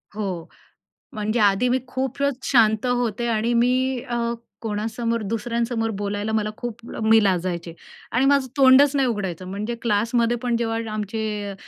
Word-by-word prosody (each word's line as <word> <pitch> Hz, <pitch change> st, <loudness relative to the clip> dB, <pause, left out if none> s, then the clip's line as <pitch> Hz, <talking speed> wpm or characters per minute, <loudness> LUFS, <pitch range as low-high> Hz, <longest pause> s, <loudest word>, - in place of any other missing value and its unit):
हो, 190 Hz, -6 st, -4 dB, 0.7 s
म्हणजे 215 Hz, +1 st, -1 dB
आधी 205 Hz, +4 st, +3 dB
मी 255 Hz, +1 st, +2 dB
खूपच 265 Hz, +1 st, -1 dB
शांत 220 Hz, -3 st, +4 dB
होते 240 Hz, -2 st, 0 dB
आणि 230 Hz, +1 st, +1 dB
मी 255 Hz, +2 st, +2 dB
अ, 240 Hz, -3 st, -4 dB, 0.5 s
कोणासमोर, 225 Hz, +2 st, -2 dB
दुसऱ्यांसमोर 230 Hz, +2 st, -1 dB
बोलायला 205 Hz, +1 st, -2 dB
मला 215 Hz, -1 st, 0 dB
खूप 240 Hz, -3 st, -5 dB
म -, -, -8 dB
मी 225 Hz, -1 st, +6 dB
लाजायचे 175 Hz, -3 st, -1 dB, 0.4 s
आणि 250 Hz, +3 st, +2 dB
माझं 280 Hz, -1 st, +3 dB
तोंडच 275 Hz, +1 st, +6 dB
नाही 270 Hz, -2 st, +3 dB
उघडायचं. 190 Hz, -5 st, -3 dB
म्हणजे 210 Hz, +5 st, -4 dB
क्लासमध्ये 235 Hz, +2 st, +1 dB
पण 245 Hz, -1 st, +1 dB
जेव्हा 225 Hz, -1 st, -1 dB
आमचे 210 Hz, -1 st, -3 dB
225 Hz, 145 wpm, -23 LUFS, 210-245 Hz, 0.7 s, मी